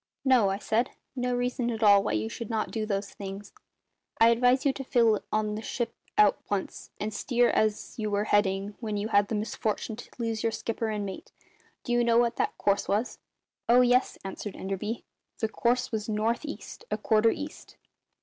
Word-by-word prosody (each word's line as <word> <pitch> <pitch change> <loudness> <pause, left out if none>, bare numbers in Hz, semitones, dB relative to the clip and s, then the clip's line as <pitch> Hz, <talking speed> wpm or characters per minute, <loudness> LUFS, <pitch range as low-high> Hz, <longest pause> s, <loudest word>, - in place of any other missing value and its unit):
"No," 250 -7 +5
I 195 - -1
said; 225 +4 0 0.3
"no 250 -1 0
reason 245 0 -1
at 225 -1 -2
all 200 -1 +7
why 105 - -2
you 110 0 0
should 215 - -6
not 220 -2 -1
do 220 -1 -2
those 200 -1 -2
things. 195 0 -8 0.7
I 225 - +7
advise 250 +4 +3
you 275 - +3
to 270 - -6
fill 230 -5 +3
on 215 0 0
the 215 - -4
ship 230 +1 -3 0.2
at 210 -1 +6
once, 200 -2 -3
and 210 +1 -3
steer 245 +1 +2
as 215 +2 0
you 215 -1 -1
were 205 0 +1
heading 205 -1 +1
when 215 -3 -3
you 205 +2 -2
had 205 -2 +4
the 220 - -2
misfortune 215 +1 -2
to 240 - -10
lose 225 -2 -2
your 230 - +1
skipper 225 0 -3
and 210 -1 -2
mate. 190 -1 -8 0.5
Do 240 - -4
you 240 0 +3
know 235 -1 +3
what 235 -1 +2
that - - -1
course 200 0 +1
was?" 215 +5 -1 0.5
"Oh 245 +1 +7
yes," 250 +1 +3
answered 195 +1 -6
Enderby; 195 +4 -4 0.3
"the 220 - 0
course 245 +3 0
was 220 -1 -3
north 220 +6 0
east, 295 - -8
a - - -1
quarter 220 0 +3
east." 295 +6 -6
220 Hz, 200 wpm, -28 LUFS, 205-240 Hz, 0.7 s, all